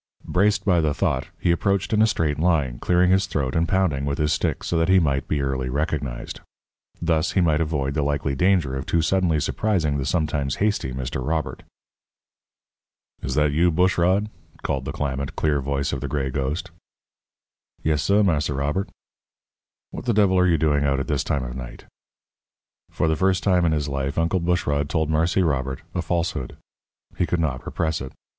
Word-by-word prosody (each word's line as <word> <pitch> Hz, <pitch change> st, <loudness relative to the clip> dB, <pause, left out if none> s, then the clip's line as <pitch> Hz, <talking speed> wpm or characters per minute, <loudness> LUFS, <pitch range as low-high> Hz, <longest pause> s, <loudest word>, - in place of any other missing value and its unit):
Braced 100 Hz, +3 st, +1 dB
by 90 Hz, -4 st, +3 dB
the 75 Hz, -2 st, 0 dB
thought, 65 Hz, -, 0 dB
he 85 Hz, -, +2 dB
approached 100 Hz, +4 st, 0 dB
in 105 Hz, -, +4 dB
a 110 Hz, -, +5 dB
straight 75 Hz, -8 st, 0 dB
line, 75 Hz, -8 st, +1 dB
clearing 90 Hz, +1 st, +3 dB
his 95 Hz, +1 st, +3 dB
throat 70 Hz, -7 st, -2 dB
and 85 Hz, +1 st, +2 dB
pounding 90 Hz, -7 st, +1 dB
with 70 Hz, 0 st, -1 dB
his 75 Hz, 0 st, +1 dB
stick -, -, -1 dB
so -, -, -2 dB
that 80 Hz, +2 st, +1 dB
he 95 Hz, -, +6 dB
might 70 Hz, -5 st, 0 dB
be 75 Hz, -2 st, 0 dB
early 65 Hz, -1 st, -2 dB
recognized. 70 Hz, -3 st, -3 dB, 0.6 s
Thus 80 Hz, -2 st, 0 dB
he -, -, +2 dB
might 80 Hz, -3 st, +2 dB
avoid 75 Hz, -4 st, -1 dB
the 75 Hz, -, 0 dB
likely 70 Hz, -1 st, -1 dB
danger 85 Hz, -3 st, +2 dB
of 65 Hz, -, -5 dB
too 85 Hz, -1 st, +1 dB
suddenly 85 Hz, -2 st, +2 dB
surprising 80 Hz, -3 st, 0 dB
the 65 Hz, -, -2 dB
sometimes 75 Hz, -5 st, 0 dB
hasty 105 Hz, -10 st, 0 dB
Mr. 65 Hz, 0 st, -4 dB
Robert. 80 Hz, +2 st, -2 dB, 1.6 s
"Is -, -, -3 dB
that 75 Hz, -1 st, +3 dB
you, 85 Hz, +4 st, +3 dB
Bushrod?" 90 Hz, +3 st, +2 dB, 0.4 s
called 65 Hz, -1 st, -2 dB
the -, -, -3 dB
clamant, 70 Hz, -2 st, -3 dB
clear 75 Hz, -2 st, +1 dB
voice 70 Hz, 0 st, -2 dB
of 70 Hz, -, -3 dB
the -, -, -3 dB
gray 65 Hz, -3 st, -2 dB
ghost. 70 Hz, +5 st, -3 dB, 1.1 s
"Yes, 75 Hz, -2 st, +1 dB
suh, 100 Hz, +7 st, +3 dB
Marse 80 Hz, -6 st, +1 dB
Robert." 75 Hz, +8 st, -1 dB, 1.0 s
"What -, -, -7 dB
the 120 Hz, -4 st, +1 dB
devil 100 Hz, -3 st, +4 dB
are 90 Hz, -, +4 dB
you 85 Hz, -2 st, +3 dB
doing 75 Hz, -3 st, +2 dB
out 70 Hz, -1 st, +1 dB
at 70 Hz, -, -2 dB
this 75 Hz, -4 st, -1 dB
time 70 Hz, -3 st, -1 dB
of -, -, -6 dB
night?" 60 Hz, -2 st, -8 dB, 1.0 s
For -, -, -1 dB
the 80 Hz, -, +2 dB
first 95 Hz, +1 st, +1 dB
time 90 Hz, -3 st, +3 dB
in 80 Hz, -, +2 dB
his 75 Hz, -2 st, 0 dB
life, 70 Hz, 0 st, -3 dB
Uncle 85 Hz, +3 st, +1 dB
Bushrod 75 Hz, -5 st, 0 dB
told 80 Hz, -2 st, 0 dB
Marse 80 Hz, +4 st, +1 dB
Robert 65 Hz, -7 st, 0 dB
a 90 Hz, -, -1 dB
falsehood. 85 Hz, -5 st, -2 dB, 0.6 s
He 90 Hz, -, +2 dB
could 90 Hz, -, 0 dB
not 70 Hz, -6 st, -1 dB
repress 80 Hz, -3 st, -1 dB
it. 65 Hz, -, -7 dB
75 Hz, 190 wpm, -23 LUFS, 70-90 Hz, 1.6 s, he